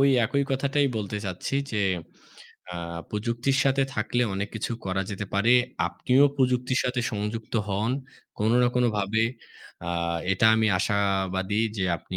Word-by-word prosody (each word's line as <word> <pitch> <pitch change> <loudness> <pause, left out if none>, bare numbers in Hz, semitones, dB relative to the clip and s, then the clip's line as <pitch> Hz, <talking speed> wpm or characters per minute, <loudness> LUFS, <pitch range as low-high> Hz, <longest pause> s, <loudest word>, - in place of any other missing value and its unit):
ওই 140 0 +5
একই 140 +5 +1
কথাটাই 140 +2 +1
বলতে 105 -1 -3
চাচ্ছি 95 +7 -4 0.2
যে 105 - 0 0.9
আ - - -4 0.3
প্রযুক্তির 115 +5 0
সাথে 135 0 +3
থাকলে 120 +3 0
অনেক 100 +2 -2
কিছু 110 +2 -3
করা 95 0 -1
যেতে 100 0 -4
পারে। 105 +5 +4 0.3
আপনিও 125 +10 +3
প্রযুক্তির 125 -1 +1
সাথে 125 0 0
সংযুক্ত 105 +2 -4
হন 105 +4 0 0.5
কোনো 110 +2 +2
না 125 - +4
কোনোভাবে। 110 -3 +1 0.6
আ - - -2 0.4
এটা 95 +4 +3
আমি 110 0 +3
আশাবাদী 95 -1 0 0.2
যে 100 - 0
আপনি - - -8
110 Hz, 145 wpm, -26 LUFS, 100-125 Hz, 0.9 s, ওই